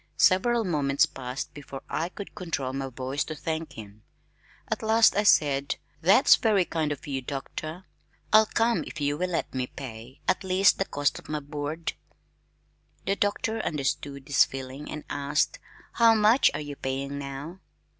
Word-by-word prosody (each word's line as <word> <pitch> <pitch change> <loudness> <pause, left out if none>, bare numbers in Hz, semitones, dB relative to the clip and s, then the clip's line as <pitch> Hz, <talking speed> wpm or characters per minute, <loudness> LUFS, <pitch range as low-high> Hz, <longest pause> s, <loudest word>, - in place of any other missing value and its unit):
Several 230 +5 +4
moments 145 -7 +2
passed 125 0 -6
before 140 -2 -9
I 165 +2 -2
could 200 +1 -9
control 165 -9 -3
my 135 0 -3
voice 130 +3 -2
to 155 - -5
thank 160 +1 -4
him. 105 -1 -11 0.7
At - - -2
last 220 +1 +5
I 205 - +3
said, 140 -8 +3 0.3
"That's 195 - +6
very 205 -5 +3
kind 160 -3 -1
of 145 - -5
you, 135 -3 -3
Doctor. 155 +6 -6 0.5
I'll 215 0 +7
come 230 +2 +1
if - - -7
you 145 0 0
will 180 +4 -2
let 175 - -2
me 130 -1 -2
pay 120 -1 -9
at 185 - +1
least 190 +1 +4
the 195 - +1
cost 145 -4 -1
of - - -16
my 150 0 -1
board." 150 +2 -4 1.1
The 195 - +1
Doctor 205 +2 0
understood 140 -1 -2
this 145 - +5
feeling 135 +2 -7
and 150 - -6
asked, 145 - 0 0.3
"How 230 -1 +5
much 220 +4 +5
are 145 - -3
you 145 -1 -6
paying 140 +1 -3
now?" 140 +6 -7
150 Hz, 165 wpm, -27 LUFS, 135-190 Hz, 1.1 s, I'll